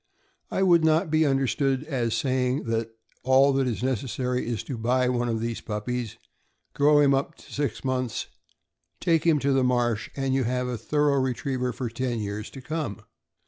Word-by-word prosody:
I 190 - 0
would 170 -3 +5
not 160 +1 +3
be 155 -1 +3
understood 135 0 +1
as 125 -7 -1
saying 130 +2 0
that 115 0 -1 0.3
all 135 +2 +4
that 135 -1 +1
is 115 -2 -3
necessary 125 0 -1
is 115 -4 -2
to 135 - -5
buy 125 +3 +1
one 120 -1 0
of 115 -1 -1
these 115 0 -3
puppies, 115 +2 -4 0.6
grow 145 +1 +4
him 140 -1 +5
up 135 +1 -1
to - - -15
six 145 0 -2
months, 130 -3 -1 0.7
take 165 -1 +2
him 160 -2 +5
to 140 -1 +1
the 135 -1 +3
marsh, 120 -3 +1
and 135 -1 -1
you 135 0 +2
have 125 +1 -1
a 125 - -2
thorough 145 +4 +1
retriever 130 0 -1
for 125 +1 -4
ten 120 +1 -2
years 105 0 -4
to 135 - -10
come. 150 - -4
130 Hz, 185 wpm, -26 LUFS, 120-140 Hz, 0.7 s, would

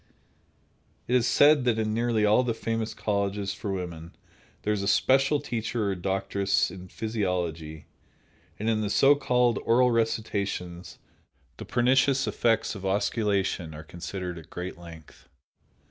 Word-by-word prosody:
It 125 - -1
is 125 -1 +3
said 145 -1 +5
that 120 -2 +2
in 110 -1 -1
nearly 115 -1 +1
all 105 +4 +4
the 120 -3 -1
famous 115 0 -3
colleges 100 -1 -1
for 100 +1 -5
women 85 -3 -6 0.5
there 105 - +1
is 105 - -2
a 100 - -2
special 135 +7 +3
teacher 115 -3 -2
or - - -2
doctress 95 +1 0
in 90 0 -10
physiology, 90 -8 -3 0.7
and 110 - -4
in 110 -1 +1
the 105 - -1
so 135 +7 +5
called 125 -5 +1
oral 125 +2 +4
recitations 100 -6 -2 0.6
the - - -8
pernicious 130 +2 +2
effects 115 -1 +1
of 100 - -8
osculation 95 -4 0
are 75 - -9
considered 90 +2 -6
at 80 - -15
great 90 +1 -6
length. 85 -3 -14
105 Hz, 145 wpm, -27 LUFS, 90-115 Hz, 0.7 s, said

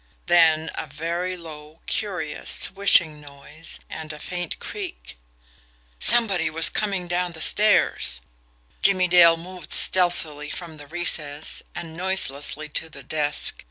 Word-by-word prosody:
Then 165 -2 +3
a - - -6
very 170 +5 -4
low, 155 -1 -13
curious, 180 -8 -4
swishing 170 -6 +3
noise, 145 +3 -9
and 160 -1 -8
a 150 - -9
faint 175 +3 -6
creak. 395 - -8 0.8
SOMEBODY 200 - +5
WAS 160 +1 +4
COMING 195 -4 -2
DOWN 175 0 -2
THE 160 - -10
STAIRS! 210 - +3 0.6
Jimmie 185 -2 +3
Dale 170 -2 +6
moved 175 -1 -11
stealthily 165 -5 +2
from 165 -1 -8
the 145 -1 -13
recess, 155 -3 0
and 165 -2 -8
noiselessly 155 -5 -2
to 160 +2 -4
the 140 -2 -13
desk. 150 +2 -2
165 Hz, 125 wpm, -23 LUFS, 150-180 Hz, 0.8 s, Dale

